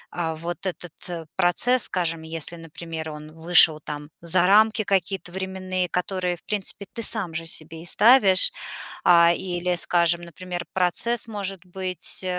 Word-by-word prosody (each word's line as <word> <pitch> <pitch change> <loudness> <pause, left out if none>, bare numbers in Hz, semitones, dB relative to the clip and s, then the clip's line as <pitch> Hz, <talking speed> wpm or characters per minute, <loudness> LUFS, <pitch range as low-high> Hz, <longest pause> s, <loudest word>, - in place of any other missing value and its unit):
э, 165 -2 -3
вот 170 +2 -7
этот 175 -2 -7
процесс, 220 +7 +3
скажем, 165 -3 -1
если, 165 +1 -2
например, 165 0 -8
он 150 0 -11
вышел 165 -1 +5
там 150 0 -8
за 175 +1 +3
рамки 215 +2 +3
какие-то 190 -2 -2
временные, 185 -1 -4
которые, 180 0 -3
в - - -19
принципе, 200 -1 -3
ты 230 - -6
сам 195 -8 +3
же 165 0 -5
себе 160 0 -1
и - - -14
ставишь. 210 -4 +6 0.5
А, 170 -1 +5
или, 180 0 -3
скажем, 170 0 +1
например, 175 +1 -7
процесс 215 +6 0
может 195 -4 -4
быть, 185 0 -2
175 Hz, 145 wpm, -22 LUFS, 165-190 Hz, 0.5 s, ставишь